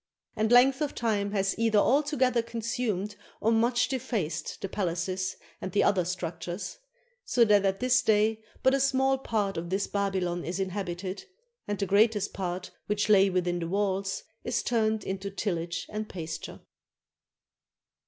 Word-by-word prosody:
And 220 +1 0
length 260 +3 +6
of 295 - -1
time 210 -4 0
has 195 -1 +1
either 225 -2 +3
altogether 260 0 +3
consumed 225 -3 -3 0.2
or 225 - +2
much 235 +2 +3
defaced 225 - -3
the - - -3
palaces 185 0 -2 0.2
and 185 - -5
the 205 - +4
other 185 -4 +3
structures; 175 - -4 0.4
so 240 - +3
that 205 -2 +4
at 195 0 +1
this 255 0 +3
day 220 +1 +2 0.2
but 260 - +5
a 275 - +3
small 270 0 +2
part 210 -7 -1
of 170 +1 -4
this 195 +2 0
Babylon 190 -3 -1
is 175 +3 -3
inhabited, 190 - -4 0.4
and 205 - -1
the 200 - -1
greatest 205 +1 +3
part 180 -1 -4 0.2
which 210 0 0
lay 195 -2 +6
within 180 -1 0
the 165 - -3
walls 195 +1 -1 0.2
is 240 -1 -1
turned 220 -3 +1
into 195 +1 -4
tillage 180 -3 -3
and 215 0 -5
pasture. 160 -3 -6
205 Hz, 155 wpm, -28 LUFS, 185-230 Hz, 0.4 s, length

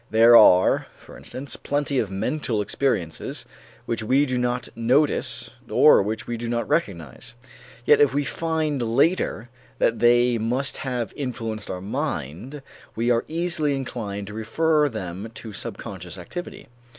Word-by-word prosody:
There 115 +2 +7
are, 90 -5 +6
for - - -15
instance, 130 -1 -7
plenty 145 -1 -1
of 105 - -1
mental 110 +4 -2
experiences 100 - -2 0.4
which 115 -1 -2
we 130 +6 +3
do 130 -2 -1
not 125 0 -1
notice 130 +6 +1 0.2
or - - +6
which 110 +3 -3
we 120 - -4
do 115 0 -5
not 120 0 -1
recognize. 100 - -3 0.5
Yet 150 - +5
if 145 - +5
we 145 +2 0
find 155 +1 -2
later 120 0 +1 0.3
that 115 - +1
they 120 0 +4
must 125 +5 -1
have 125 -5 -3
influenced 115 -6 -5
our 90 -1 -4
mind, 130 - -4 0.3
we 120 +2 +1
are 115 -1 +2
easily 160 -3 0
inclined 105 -7 -5
to 105 - -9
refer 150 +8 +1
them 100 -2 -6
to 110 -2 -8
subconscious - - -7
activity. 195 +3 -8
120 Hz, 145 wpm, -24 LUFS, 110-145 Hz, 0.5 s, There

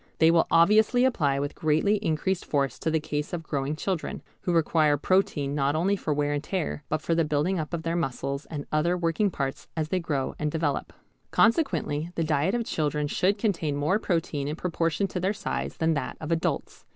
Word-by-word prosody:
They 160 +1 +5
will 165 -1 +3
obviously 215 +9 +5
apply 145 - +2
with 145 +1 -2
greatly 160 +7 +2
increased 190 -1 -1
force 140 -4 -1
to 160 - -1
the 160 0 +2
case 150 0 -4
of 170 -2 -3
growing 140 -1 -2
children, 180 +1 -3 0.2
who 180 - -2
require 155 -3 +3
protein 145 -5 +1
not 145 0 +1
only 185 +6 +2
for 165 - -3
wear 145 0 +1
and 145 0 -2
tear, 165 -4 -3
but 155 - -1
for 170 - +1
the 165 0 +3
building 155 +5 0
up 155 - -4
of 170 -2 -3
their 165 0 -1
muscles 140 -2 -2
and 145 -3 -5
other 170 +4 +2
working 175 +4 +1
parts 135 -6 -4
as 155 -1 -1
they 185 - +1
grow 145 -6 -2
and 150 -1 -1
develope. 155 -3 -1 0.4
Consequently 200 - +2
the 165 - 0
diet 155 +6 +1
of 235 -1 -1
children 150 -4 -1
should 190 +7 +1
contain 175 -9 0
more 150 +8 +1
protein 165 -7 -1
in 150 - -2
proportion 170 +1 0
to 190 - -3
their 190 +3 +1
size - - -4
than 160 0 +2
that 145 - -3
of 160 +1 -5
adults. 165 0 -2
160 Hz, 205 wpm, -27 LUFS, 150-180 Hz, 0.4 s, They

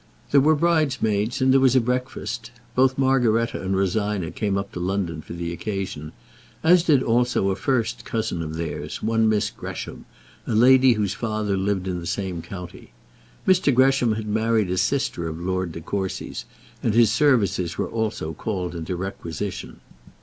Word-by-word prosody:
There 140 - +6
were 155 +3 +4
bridesmaids 135 -9 +1
and 130 0 +4
there 135 - +6
was 130 -1 +4
a - - +7
breakfast. 125 +2 -3 0.2
Both 130 +1 +3
Margaretta 125 -4 +2
and 95 0 -1
Rosina 100 -2 0
came 100 -3 -1
up 100 0 -4
to - - -6
London 90 -3 -2
for - - -9
the 85 0 -4
occasion, 95 -6 -4 0.5
as 175 +2 +6
did 150 -6 +3
also 120 -4 +2
a - - -1
first 115 +2 -1
cousin 110 -8 -2
of 80 -1 -5
theirs, 80 0 -5
one 115 0 +2
Miss 105 0 +1
Gresham, 120 - -7 0.4
a - - 0
lady 130 +2 +6
whose 105 -3 -1
father 110 -2 -2
lived 95 -1 -1
in 90 -1 -2
the 85 - -7
same 90 -1 -3
county. 90 0 -9 0.6
Mr. 185 -6 +4
Gresham 130 -2 +3
had 110 0 -4
married 110 -2 +1
a 90 - -1
sister 130 -11 0
of 80 0 -5
Lord 95 0 -2
De 85 - -7
Courcy's, 95 +2 -4 0.4
and 110 - 0
his 115 -2 +5
services 105 - +2
were - - 0
also 110 -8 -3
called 90 0 -3
into 85 +1 -4
requisition. 95 +1 -5
105 Hz, 170 wpm, -23 LUFS, 95-125 Hz, 0.6 s, a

